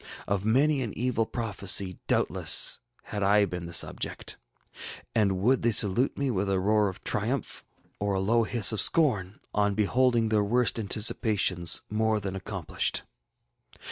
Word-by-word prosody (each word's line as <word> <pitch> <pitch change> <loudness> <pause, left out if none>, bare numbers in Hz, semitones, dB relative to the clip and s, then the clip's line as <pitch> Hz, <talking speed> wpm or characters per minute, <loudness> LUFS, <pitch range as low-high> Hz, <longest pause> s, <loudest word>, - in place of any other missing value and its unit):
Of 100 +1 -2
many 140 +5 +2
an 115 -5 -5
evil 115 -1 -1
prophecy, 100 -5 0
doubtless, - - +1 0.2
had 105 - -6
I 100 +1 +3
been 90 -2 -6
the - - -9
subject. 80 - 0 0.8
And 100 -4 +1
would 125 +4 +2
they 120 - +2
salute 105 +5 +3
me 140 -2 -1
with 100 -2 -2
a 95 -1 0
roar 105 +1 +1
of 95 - -11
triumph - - -3 0.4
or 100 -1 -1
a - - 0
low 115 +5 +1
hiss 115 -2 +3
of 110 -3 0
scorn, 110 - +1
on 105 -1 0
beholding 115 +2 +1
their 105 -1 +1
worst 120 +2 +1
anticipations 100 -4 +1
more 110 0 0
than 95 -2 -6
accomplished? 95 -3 -3
105 Hz, 150 wpm, -27 LUFS, 95-115 Hz, 0.8 s, I